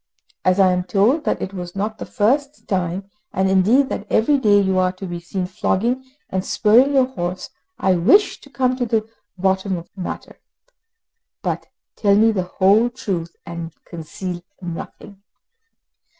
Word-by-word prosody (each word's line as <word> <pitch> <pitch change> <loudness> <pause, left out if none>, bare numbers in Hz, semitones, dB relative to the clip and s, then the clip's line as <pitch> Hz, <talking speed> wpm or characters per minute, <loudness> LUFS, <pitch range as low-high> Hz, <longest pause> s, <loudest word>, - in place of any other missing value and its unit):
As 185 +1 +3
I 190 -1 +6
am 180 0 0
told 225 - +2
that - - 0
it 190 - -5
was 180 -1 -7
not 210 +2 -3
the - - -6
first 275 +6 0
time, 185 0 -2 0.2
and 190 +1 +1
indeed 215 +9 +4
that 210 - -4
every 280 +6 +3
day 205 -4 +5
you 190 -1 +2
are 185 0 +2
to 190 +1 -8
be 175 -1 -5
seen 180 +2 -4
flogging 230 +7 -1 0.3
and 185 0 -1
spurring 245 +9 +4
your 265 -1 +5
horse, 185 -7 -5 0.3
I 190 - +2
wish 265 - +4
to 280 - -15
come 255 -2 0
to 245 -2 -1
the 220 -1 0 0.3
bottom 190 0 0
of 170 - -9
the 195 - -9
matter. - - -6 1.0
But - - -2 0.3
tell 200 -2 +3
me 220 +2 +5
the 200 -4 0 0.2
whole 205 +5 +5
truth, 185 -9 -4
and 170 -1 -7
conceal 175 +2 -6 0.2
nothing." 190 +3 -8
195 Hz, 165 wpm, -21 LUFS, 185-230 Hz, 1.0 s, I